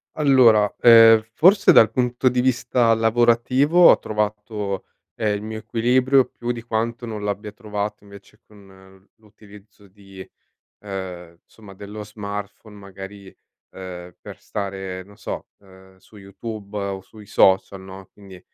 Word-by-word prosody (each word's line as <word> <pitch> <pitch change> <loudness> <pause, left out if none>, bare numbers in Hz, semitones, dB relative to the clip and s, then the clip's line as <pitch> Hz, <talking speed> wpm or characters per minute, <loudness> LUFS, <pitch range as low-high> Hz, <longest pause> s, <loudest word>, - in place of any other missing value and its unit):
Allora, 125 -8 +4
ehm, 115 -2 +7
forse 195 +5 +5
dal 110 -1 +6
punto 125 +1 -1
di 125 0 0
vista 120 -1 +1
lavorativo 120 +8 +3
ho - - +2
trovato, 105 -2 -4 0.3
ehm, 105 -2 -1
il 100 - -6
mio 110 0 -6
equilibrio 125 +4 +2
più 120 0 -6
di 120 -1 -7
quanto 115 +1 -3
non 110 -2 -6
l'abbia 105 +1 -4
trovato 105 0 -6
invece 100 -1 -17
con, 105 - -19
mhmm, 95 0 -19
l'utilizzo 105 -1 -19
di, 95 -1 -14 0.6
ehm, 90 -4 -8
insomma, 105 -3 -16
dello 105 +2 -9
smartphone, 105 0 -8
magari, 100 0 -12 0.4
ehm, 90 -2 -9
per - - -11
stare, 95 -2 -6
non 100 +2 -19
so, - - -7
ehm, 95 -1 -20
su 95 +3 -21
YouTube 100 +1 -9
o 100 -1 -4
sui 105 0 -16
social, 95 0 +2
no, 95 0 -12
quindi, 95 -3 -15
105 Hz, 140 wpm, -21 LUFS, 95-115 Hz, 0.6 s, ehm